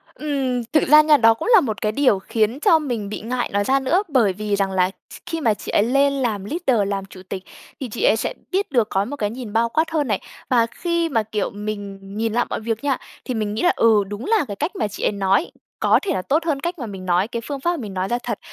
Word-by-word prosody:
Ừm, 270 -5 -1
thực 305 - +3
ra 300 +2 +8
nha, 305 -1 +5
đó 225 -2 +6
cũng 225 - -6
là 410 - +8
một 215 -6 -3
cái 215 - +1
điều 235 -6 +3
khiến 225 +6 0
cho 320 +1 +5
mình 235 -9 -3
bị - - -5
ngại 245 +2 -2
nói 205 0 +2
ra 270 +5 +2
nữa. 340 +10 +1
Bởi 230 -9 +3
vì 210 +1 -2
rằng 195 -1 0
là 185 -1 +2
th - - -16
khi 330 -2 -4
mà 225 -5 +3
chị - - -7
ấy 205 - +3
lên 275 +4 +3
làm 225 -8 -1
leader, 255 - 0
làm 195 -1 -2
chủ 185 -1 -13
tịch, 190 -1 -5 0.4
thì 260 -4 -5
chị 225 - -4
ấy 215 - +5
sẽ - - -2 0.2
biết 385 -4 -1
được, 235 -5 +2
có 195 +1 0
một 285 - -5
cái 205 -6 -1
nhìn 230 -2 -7
bao 230 +1 +2
quát 320 +5 0
hơn 300 -4 0
này. 205 -3 0 0.3
Và 235 -3 +4
khi 340 -1 -1
mà, 225 -5 +1
kiểu, 210 -1 -2
mình 205 -1 -6 0.2
nhìn 225 0 -1
lại 240 - +2
mọi - - -2
việc 225 +2 -3
nha, 275 -2 +1 0.3
thì 255 - -2
mình 215 -2 -2
nghĩ 215 - -2
là 355 - +4
"Ừ, 220 -3 +4
đúng 205 +5 -6
là 435 -8 +2
cái 200 - -5
cách 305 - -3
mà 215 - 0
chị 205 - -7
ấy - - +3
nói 195 - +1 0.3
có - - +4
thể 375 -5 0
là - - -1
tốt 305 - +1
hơn 295 -4 0
cách 345 +1 -4
mà 240 - -4
mình 190 -3 -8
nói, 180 +3 +2
cái 235 -1 -4
phương 280 -1 -4
pháp 345 +5 +1
mà 345 - -2
mình 210 -7 -6
nói 185 0 -1
ra 240 - 0
thật." - - -3
230 Hz, 280 wpm, -21 LUFS, 205-285 Hz, 0.4 s, ra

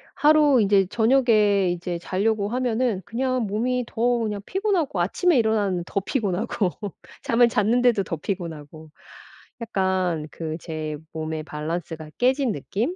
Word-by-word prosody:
하루 295 -3 +5
이제 200 -2 +4
저녁에 215 -6 +3
이제 175 0 -4
자려고 205 +3 0
하면은 245 -4 0
그냥 255 +1 -1
몸이 245 +4 -1
더 225 - -6 0.2
그냥 210 -3 -2
피곤하고 370 - 0
아침에 325 - +2
일어나면 210 -6 +1
더 200 - -1
피곤하고 200 -3 -1 0.5
잠을 235 +1 +4
잤는데도 230 0 +2
더 165 - -4
피곤하고 160 -3 -6 0.7
약간 185 -7 -1
그 160 -1 -5
제 155 -2 -5 0.2
몸의 155 0 -4
밸런스가 155 +1 -5
깨진 260 0 +2
느낌? 215 - -3
205 Hz, 290 characters per minute, -24 LUFS, 175-245 Hz, 0.7 s, 하루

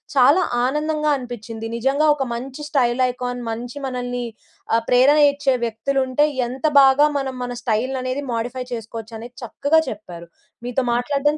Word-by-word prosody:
చాలా 280 +7 +6 0.2
ఆనందంగా 300 +2 0
అనిపించింది. 225 -2 -7
నిజంగా 275 +6 +2
ఒక 275 -2 -2
మంచి 265 +5 -6
స్టైల్ 255 -3 +2
ఐకాన్, 245 0 -4
మంచి 240 +4 -6
మనల్ని 245 -1 -3 0.5
ఆహ్, 230 - -2
ప్రేరణ 260 +4 +5
ఇచ్చే 280 -2 0
వ్యక్తులు 235 +5 -1
ఉంటే, 260 +4 +3 0.2
ఎంత 255 +4 -6 0.2
బాగా 270 +2 +6
మనం 265 -1 -4
మన 245 0 -4
స్టైల్ 240 +3 0
అనేది 255 +3 -2
మోడిఫై 245 +2 -3
చేసుకోవచ్చు 225 0 -7
అనేది 240 +2 -10
చక్కగా 285 +6 +2
చెప్పారు. 180 -6 -9 0.4
మీతో 245 +2 0
మాట్లాడడం 280 +5 +1
250 Hz, 150 wpm, -21 LUFS, 235-275 Hz, 0.5 s, చాలా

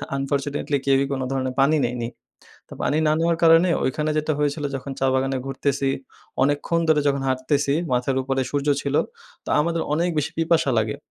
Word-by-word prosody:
Unfortunately 140 +1 -1
কেউই 135 0 +3
কোন 135 -1 -2
ধরনের 130 -1 -1
পানি 150 +3 +4
নেইনি। 120 -1 -3 0.6
তো - - -14
পানি 150 - +1
না 150 - +3
নেওয়ার 165 0 +1
কারণে 165 +2 +6 0.2
ওইখানে 150 +4 -1
যেটা 155 +1 0
হয়েছিল, 145 0 -1
যখন 135 +1 -5
চা 135 - +2
বাগানে 135 0 0
ঘুরতেছি 135 0 -1 0.5
অনেকক্ষণ 145 +4 +1
ধরে 155 -1 +4
যখন 140 -1 +1
হাঁটতেছি, 140 +2 0 0.2
মাথার 125 +2 0
উপরে 135 0 -1
সূর্য 145 0 -1
ছিল, 140 0 -3 0.5
তো - - -10
আমাদের 165 +1 0
অনেক 170 +3 +1
বেশি 150 +1 -1
পিপাসা 165 -3 +2
লাগে। 110 -1 -1
140 Hz, 175 wpm, -23 LUFS, 135-155 Hz, 0.6 s, কারণে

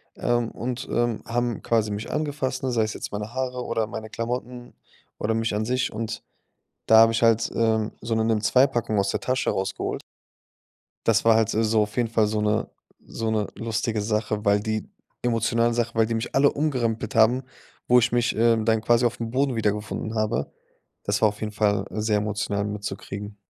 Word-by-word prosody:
ähm, 120 -1 0
und, 125 +2 -4
ähm, 120 -2 0
haben 120 -1 -1
quasi 110 -2 +1
mich 105 +2 -4
angefasst, 140 -4 -2
ne, 130 - 0
sei 115 -2 +2
es 110 - -2
jetzt - - -6
meine 105 +3 -5
Haare 125 -1 -2
oder 115 -2 0
meine 110 -1 -7
Klamotten 120 +1 -5 0.4
oder 110 +1 0
mich 115 -1 -1
an 105 +1 -1
sich. 125 +2 0
Und 110 0 -5 0.6
da 110 - +6
habe 115 0 +7
ich 115 - 0
halt, 115 0 +4
ähm, 110 -1 +1
so 115 +1 -2
'ne 110 - +1
nimm2-Packung 115 0 +2
aus 100 0 +1
der - - -1
Tasche 130 0 0
rausgeholt. 95 0 -3 1.1
Das 115 0 +3
war 115 -1 +6
halt, 110 0 +2
äh, 110 - +2
so 110 0 +3
auf 105 +3 -3
jeden 120 -2 +1
Fall 110 -2 +2
so 105 0 -1
'ne 105 0 0 0.4
so 115 -1 -3
'ne 105 -2 0
lustige 110 -1 -2
Sache, 105 0 -1
weil 100 0 +4
die 110 0 -3 0.4
emotionale 115 0 +1
Sache, 120 0 -1
weil 115 - +4
die 115 - -3
mich 115 +3 -3
alle 140 +1 +5
umgerempelt 130 -5 -1
haben, 115 +4 +4 0.4
wo 125 - +6
ich 120 0 +1
mich, 120 0 +1
ähm, 115 -1 +3
dann 110 -1 +2
quasi 120 +2 +3
aufm 115 -1 -2
Boden 135 0 +1
wiedergefunden 105 0 -2
habe. 110 -1 -1 0.5
Das 100 +1 -1
war 110 - +6
auf 105 - -10
jeden 110 -1 -3
Fall 105 -2 +1
sehr 105 0 0
emotional 105 -1 -1
mitzukriegen. 105 0 -6
115 Hz, 190 wpm, -25 LUFS, 105-120 Hz, 1.1 s, habe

